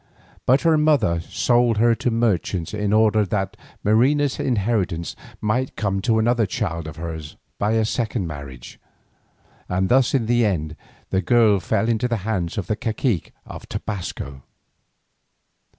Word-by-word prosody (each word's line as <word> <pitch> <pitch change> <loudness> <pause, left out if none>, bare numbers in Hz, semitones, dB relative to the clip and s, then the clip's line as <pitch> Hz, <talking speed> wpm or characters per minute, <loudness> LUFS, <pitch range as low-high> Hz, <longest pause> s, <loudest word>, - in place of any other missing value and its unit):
But 130 +3 +5
her 165 -2 +3
mother 130 - +3
sold 120 +5 +2
her 115 +2 +4
to 120 - -1
merchants 105 -7 0
in 105 -1 -1
order 110 0 +4
that 95 0 -2 0.3
Marina's 135 +7 +2
inheritance 100 - -1 0.3
might 125 +5 -1
come 100 -2 -1
to 110 +1 +2
another 115 0 +2
child 85 -3 -3
of 80 - -8
hers 80 -2 -6 0.2
by 105 +2 +1
a 110 -1 +2
second 110 -3 -1
marriage, 70 -6 -9 0.9
and 95 +1 0
thus 130 +1 +3
in 125 -4 +1
the 120 +1 +2
end 80 -7 -1 0.4
the 95 - +2
girl 110 -1 +4
fell 110 - 0
into 115 +1 +1
the 120 -2 -1
hands 95 -7 -2
of 100 - -2
the 110 - -1
cacique 110 - -1
of - - -10
Tobasco. 85 -9 -5
110 Hz, 150 wpm, -22 LUFS, 90-120 Hz, 0.9 s, But